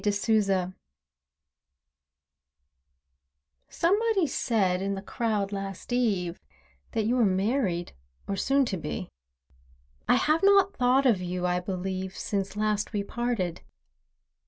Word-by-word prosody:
A 210 Hz, -, +2 dB
LEAF 200 Hz, -3 st, +1 dB, 3.0 s
Somebody 405 Hz, +2 st, +2 dB
said, 195 Hz, -9 st, 0 dB
in 195 Hz, 0 st, -1 dB
the 195 Hz, -, -5 dB
crowd, 210 Hz, -2 st, -1 dB
last 195 Hz, +3 st, -5 dB
eve, 195 Hz, -8 st, 0 dB, 0.5 s
That 220 Hz, -3 st, 0 dB
you 235 Hz, +3 st, +2 dB
were 245 Hz, -, +4 dB
married, 195 Hz, -2 st, 0 dB, 0.3 s
or 200 Hz, -, -1 dB
soon 275 Hz, +7 st, +2 dB
to 195 Hz, -5 st, -2 dB
be. 75 Hz, -, -5 dB, 1.0 s
I -, -, +5 dB
have 310 Hz, +2 st, +2 dB
not 395 Hz, 0 st, +5 dB
thought 255 Hz, +2 st, +3 dB
of 225 Hz, -8 st, +3 dB
you, 180 Hz, 0 st, -3 dB
I 180 Hz, 0 st, +1 dB
believe, 185 Hz, +1 st, -4 dB
Since 195 Hz, -1 st, -2 dB
last 210 Hz, 0 st, -1 dB
we 205 Hz, -1 st, 0 dB
parted. 230 Hz, -6 st, -2 dB
205 Hz, 120 wpm, -27 LUFS, 185-245 Hz, 3.0 s, I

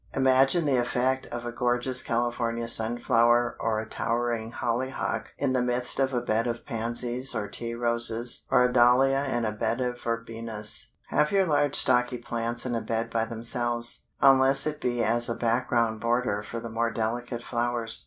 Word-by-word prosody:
Imagine 135 Hz, +5 st, +3 dB
the 140 Hz, -3 st, +2 dB
effect 130 Hz, +2 st, -1 dB
of 120 Hz, 0 st, -7 dB
a 120 Hz, -, -4 dB
gorgeous 125 Hz, +2 st, 0 dB
California 115 Hz, -1 st, -2 dB
Sunflower 120 Hz, +1 st, +2 dB
or 110 Hz, -1 st, -1 dB
a 110 Hz, -, -6 dB
towering 115 Hz, -1 st, -2 dB
Hollyhock 120 Hz, -2 st, -3 dB
in 135 Hz, -2 st, -1 dB
the 130 Hz, -, +1 dB
midst 125 Hz, +1 st, +2 dB
of 135 Hz, 0 st, +1 dB
a 125 Hz, -2 st, -1 dB
bed 115 Hz, 0 st, -1 dB
of 115 Hz, 0 st, -5 dB
Pansies, 120 Hz, +3 st, +1 dB
or 105 Hz, -2 st, -3 dB
Tea 115 Hz, +2 st, -4 dB
Roses, 120 Hz, 0 st, 0 dB
or -, -, +4 dB
a 125 Hz, 0 st, +1 dB
Dahlia 130 Hz, +3 st, +4 dB
in 120 Hz, -1 st, -1 dB
a 110 Hz, -, -1 dB
bed 110 Hz, +3 st, -2 dB
of 125 Hz, -1 st, -3 dB
Verbenas! 115 Hz, -2 st, -2 dB, 0.2 s
Have 150 Hz, 0 st, +1 dB
your 195 Hz, -1 st, +3 dB
large 145 Hz, -3 st, +1 dB
stocky 125 Hz, 0 st, +2 dB
plants 120 Hz, 0 st, -3 dB
in 125 Hz, -, -3 dB
a 115 Hz, -, -2 dB
bed 115 Hz, +1 st, -3 dB
by 115 Hz, -1 st, 0 dB
themselves, 120 Hz, +1 st, +1 dB, 0.2 s
unless 135 Hz, 0 st, +5 dB
it 150 Hz, -1 st, -4 dB
be 120 Hz, -1 st, -1 dB
as 120 Hz, +2 st, +3 dB
a 115 Hz, -, -2 dB
background 115 Hz, -1 st, 0 dB
border 115 Hz, -3 st, 0 dB
for 115 Hz, +3 st, -7 dB
the 115 Hz, -, -7 dB
more 115 Hz, +1 st, -1 dB
delicate 120 Hz, +2 st, -4 dB
flowers. 120 Hz, -2 st, +1 dB
120 Hz, 175 wpm, -26 LUFS, 115-125 Hz, 0.2 s, unless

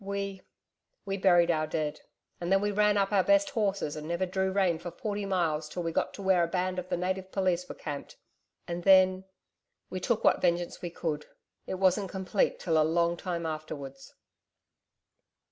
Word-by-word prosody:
We... 200 Hz, -1 st, -4 dB, 0.6 s
we 195 Hz, 0 st, -2 dB
buried 175 Hz, -3 st, +4 dB
our 155 Hz, -1 st, 0 dB
dead.... 155 Hz, -1 st, -3 dB, 0.4 s
And 175 Hz, +1 st, -3 dB
then 195 Hz, -, +5 dB
we 205 Hz, +1 st, 0 dB
ran 210 Hz, 0 st, +3 dB
up 195 Hz, 0 st, +1 dB
our 195 Hz, -2 st, +4 dB
best 300 Hz, -1 st, +3 dB
horses 200 Hz, -, -1 dB
and 155 Hz, 0 st, -6 dB
never 170 Hz, +2 st, 0 dB
drew 190 Hz, +1 st, -1 dB
rein 190 Hz, -4 st, +2 dB
for 170 Hz, +1 st, -6 dB
forty 205 Hz, +3 st, -4 dB
miles 160 Hz, -5 st, 0 dB
till 175 Hz, +2 st, -4 dB
we'd 165 Hz, -1 st, -2 dB
got -, -, 0 dB
to 200 Hz, -, -8 dB
where 190 Hz, -2 st, +4 dB
a -, -, +1 dB
band 185 Hz, +1 st, -1 dB
of 180 Hz, 0 st, -7 dB
the -, -, 0 dB
Native 185 Hz, +1 st, -2 dB
Police 180 Hz, -2 st, 0 dB
were -, -, -6 dB
camped.... 145 Hz, -2 st, -7 dB, 0.5 s
And 175 Hz, 0 st, -4 dB
then... 185 Hz, 0 st, +5 dB, 0.7 s
we 185 Hz, -, -3 dB
took 220 Hz, +4 st, 0 dB
what -, -, +4 dB
vengeance 175 Hz, 0 st, 0 dB
we 175 Hz, -, -4 dB
could.... 155 Hz, -3 st, -4 dB, 0.4 s
It -, -, -2 dB
wasn't 190 Hz, +1 st, +2 dB
complete 190 Hz, +1 st, 0 dB
till 160 Hz, -3 st, +2 dB
a -, -, +5 dB
long 170 Hz, +2 st, +2 dB
time 170 Hz, -1 st, -4 dB
afterwards.' 150 Hz, -4 st, -6 dB
180 Hz, 190 wpm, -29 LUFS, 170-195 Hz, 0.7 s, then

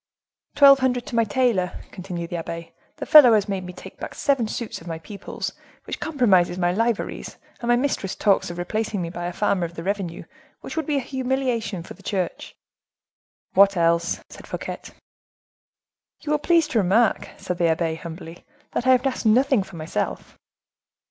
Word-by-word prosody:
"Twelve 280 Hz, -1 st, +8 dB
hundred 250 Hz, -2 st, 0 dB
to -, -, -6 dB
my 230 Hz, -, +4 dB
tailor," 220 Hz, -6 st, +1 dB, 0.2 s
continued 180 Hz, -3 st, -6 dB
the 175 Hz, -, -2 dB
abbe; 165 Hz, 0 st, -6 dB, 0.2 s
"the -, -, -6 dB
fellow 290 Hz, -7 st, +9 dB
has 210 Hz, -2 st, +2 dB
made 195 Hz, -2 st, -3 dB
me 180 Hz, -, -7 dB
take -, -, -12 dB
back -, -, -7 dB
seven 270 Hz, -5 st, +1 dB
suits 225 Hz, -3 st, -5 dB
of 165 Hz, -, -13 dB
my 165 Hz, -1 st, -4 dB
people's, 200 Hz, +5 st, -6 dB, 0.3 s
which -, -, -6 dB
compromises 200 Hz, -, +2 dB
my 175 Hz, -1 st, +1 dB
liveries, 230 Hz, +2 st, -2 dB, 0.2 s
and 235 Hz, -, -5 dB
my 240 Hz, -, +5 dB
mistress 245 Hz, -7 st, -1 dB
talks 200 Hz, -4 st, +2 dB
of 175 Hz, -, -7 dB
replacing 210 Hz, +4 st, -2 dB
me 170 Hz, -2 st, -3 dB
by 175 Hz, -1 st, -4 dB
a -, -, -3 dB
farmer 195 Hz, 0 st, 0 dB
of 170 Hz, 0 st, -5 dB
the 165 Hz, -, -6 dB
revenue, 190 Hz, -3 st, -3 dB, 0.4 s
which -, -, -7 dB
would 320 Hz, 0 st, -2 dB
be 295 Hz, -2 st, +1 dB
a -, -, 0 dB
humiliation 250 Hz, -7 st, -2 dB
for -, -, -10 dB
the 195 Hz, -, -18 dB
church." 190 Hz, -3 st, -3 dB, 1.0 s
"What 200 Hz, 0 st, +5 dB
else?" 170 Hz, 0 st, +1 dB
said -, -, -13 dB
Fouquet. -, -, -5 dB, 1.4 s
"You 300 Hz, -, -4 dB
will 300 Hz, -, +2 dB
please 330 Hz, 0 st, +3 dB
to 235 Hz, -, +2 dB
remark," 210 Hz, +4 st, +2 dB
said 180 Hz, -1 st, -4 dB
the 170 Hz, -1 st, +3 dB
abbe, 160 Hz, 0 st, 0 dB
humbly, 165 Hz, +1 st, -9 dB, 0.3 s
"that 245 Hz, -, -2 dB
I 260 Hz, -, +7 dB
have 255 Hz, +1 st, +2 dB
asked 255 Hz, -3 st, -1 dB
nothing 255 Hz, +1 st, +4 dB
for 190 Hz, -1 st, -10 dB
myself." 160 Hz, -1 st, -4 dB
200 Hz, 185 wpm, -23 LUFS, 175-250 Hz, 1.4 s, fellow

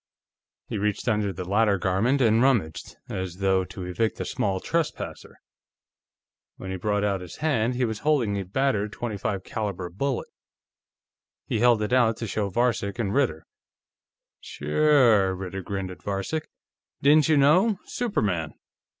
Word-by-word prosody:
He -, -, -4 dB
reached 105 Hz, +3 st, -1 dB
under 105 Hz, -3 st, +1 dB
the 90 Hz, 0 st, -6 dB
latter 105 Hz, 0 st, +3 dB
garment 100 Hz, +9 st, +1 dB
and 115 Hz, -1 st, +4 dB
rummaged, 115 Hz, -, 0 dB
as 95 Hz, -2 st, -5 dB
though 95 Hz, -1 st, +2 dB
to 90 Hz, -, -8 dB
evict 110 Hz, +5 st, -1 dB
a -, -, -2 dB
small 95 Hz, -2 st, -1 dB
trespasser. 165 Hz, -, -3 dB, 1.2 s
When 95 Hz, -, -7 dB
he 95 Hz, -, -3 dB
brought 105 Hz, +2 st, 0 dB
out 100 Hz, -2 st, 0 dB
his 90 Hz, -2 st, -9 dB
hand, 125 Hz, -6 st, 0 dB
he 125 Hz, 0 st, +1 dB
was 110 Hz, -2 st, -3 dB
holding 130 Hz, -9 st, +1 dB
a 100 Hz, -, -2 dB
battered 105 Hz, 0 st, 0 dB
.25 105 Hz, -4 st, -3 dB
caliber 100 Hz, -5 st, -4 dB
bullet. 130 Hz, +7 st, -2 dB, 1.2 s
He -, -, -1 dB
held 120 Hz, -2 st, +4 dB
it 105 Hz, -, -2 dB
out 120 Hz, -3 st, +3 dB
to 115 Hz, -, -4 dB
show 105 Hz, -1 st, -2 dB
to 95 Hz, -, -17 dB
Varcek 120 Hz, -4 st, 0 dB
and 105 Hz, -4 st, -1 dB
Ritter. 115 Hz, -, 0 dB, 0.9 s
"Sure," 110 Hz, -, +3 dB
Ritter 95 Hz, +1 st, -5 dB
grinned 95 Hz, 0 st, -4 dB
at 90 Hz, -, -12 dB
Varcek. 100 Hz, +11 st, -3 dB, 0.5 s
"Didn't 150 Hz, +2 st, +5 dB
you 155 Hz, -, +5 dB
know? 180 Hz, +10 st, +4 dB
Superman." 105 Hz, -, -2 dB
105 Hz, 150 wpm, -25 LUFS, 95-125 Hz, 1.2 s, Didn't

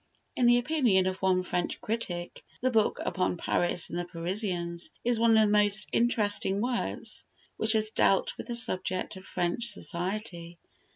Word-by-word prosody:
In 245 Hz, -, +3 dB
the 240 Hz, 0 st, +6 dB
opinion 245 Hz, -8 st, +2 dB
of 185 Hz, 0 st, -3 dB
one 185 Hz, -1 st, +2 dB
French 175 Hz, -1 st, -2 dB
critic, 180 Hz, -6 st, -4 dB, 0.2 s
the 255 Hz, +1 st, 0 dB
book 220 Hz, -3 st, +2 dB
upon 185 Hz, -2 st, -1 dB
"Paris 175 Hz, 0 st, 0 dB
and 175 Hz, -, -3 dB
the 175 Hz, -, -3 dB
Parisians" 175 Hz, -1 st, -2 dB
is 240 Hz, -1 st, +1 dB
one 230 Hz, -1 st, +5 dB
of 215 Hz, -1 st, +5 dB
the -, -, 0 dB
most 210 Hz, 0 st, +4 dB
interesting 205 Hz, -4 st, +1 dB
works 245 Hz, +2 st, -2 dB, 0.3 s
which 220 Hz, +1 st, +4 dB
has 215 Hz, -1 st, +1 dB
dealt -, -, +2 dB
with -, -, -8 dB
the 240 Hz, -, -3 dB
subject 185 Hz, -6 st, 0 dB
of 190 Hz, -, -11 dB
French 180 Hz, +6 st, -1 dB
society. 180 Hz, -3 st, -5 dB
205 Hz, 165 wpm, -28 LUFS, 180-230 Hz, 0.3 s, the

